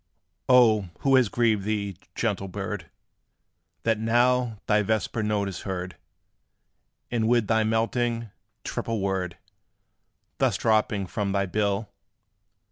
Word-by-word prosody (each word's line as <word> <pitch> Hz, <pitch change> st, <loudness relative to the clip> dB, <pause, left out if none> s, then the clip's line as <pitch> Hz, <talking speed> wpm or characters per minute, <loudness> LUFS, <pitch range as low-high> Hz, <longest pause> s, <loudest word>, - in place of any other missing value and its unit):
O 110 Hz, -7 st, +5 dB
who 135 Hz, -1 st, +4 dB
has 125 Hz, -5 st, +4 dB
grieved 110 Hz, -4 st, +2 dB
thee, 100 Hz, -2 st, -2 dB, 0.2 s
gentle 100 Hz, -4 st, -1 dB
bird, 95 Hz, -1 st, -5 dB, 0.9 s
That 115 Hz, -2 st, +1 dB
now 120 Hz, +1 st, +2 dB
thy 105 Hz, 0 st, +3 dB
vesper 110 Hz, +2 st, -1 dB
note 105 Hz, -2 st, 0 dB
is 95 Hz, -4 st, -5 dB
heard 95 Hz, -2 st, -4 dB, 1.2 s
And 115 Hz, -2 st, +1 dB
with 120 Hz, -1 st, +3 dB
thy 110 Hz, +1 st, +2 dB
melting, 115 Hz, 0 st, 0 dB, 0.3 s
triple 115 Hz, -1 st, -3 dB
word 95 Hz, -3 st, -2 dB, 1.0 s
Thus -, -, +2 dB
dropping 110 Hz, -2 st, +1 dB
from 100 Hz, +1 st, -2 dB
thy 100 Hz, -1 st, +1 dB
bill? 100 Hz, +2 st, -1 dB
110 Hz, 120 wpm, -26 LUFS, 100-115 Hz, 1.2 s, O